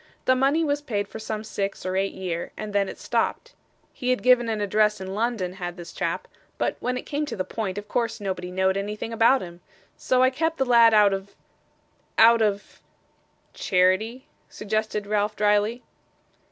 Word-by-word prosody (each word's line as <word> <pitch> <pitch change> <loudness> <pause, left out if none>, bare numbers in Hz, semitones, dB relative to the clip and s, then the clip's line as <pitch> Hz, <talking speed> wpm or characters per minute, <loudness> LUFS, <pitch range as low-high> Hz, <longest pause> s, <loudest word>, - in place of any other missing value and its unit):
'The 255 - +4
money 275 +5 +2
was 290 -1 0
paid 205 -8 -2
for 220 - -9
some 220 0 -4
six 200 -3 -4
or 185 0 -2
eight 195 +1 -1
year, 175 -3 -4
and 215 -1 -6
then 200 -1 +1
it - - -8
stopped. - - -2 0.4
He 250 - -3
had 255 - +1
given 250 -2 +4
an 220 -1 -1
address 210 +1 +2
in 190 0 -6
London, 215 -4 -1
had 175 -1 -6
this 175 -1 -9
chap; - - -3 0.3
but - - -1
when 250 0 -2
it - - -7
came 295 0 -2
to - - -4
the 185 - -2
point, 200 -2 -4
of 205 0 -6
course 230 +1 -1
nobody 185 -3 -4
knowed 190 +1 +1
anything 210 +3 -4
about 230 +4 +4
him. 175 0 -11 0.3
So 255 0 +2
I 260 - +4
kept 320 +4 -1
the 265 - +1
lad 235 -2 +6
out 205 -2 +5
of 195 +1 -6 0.8
out 230 +1 +7
of 205 -2 -1 0.4
' - - -41
'Charity?' 190 +7 +1 0.2
suggested 215 0 -2
Ralph 210 0 0
drily. 210 +3 +1
210 Hz, 190 wpm, -25 LUFS, 195-235 Hz, 0.8 s, out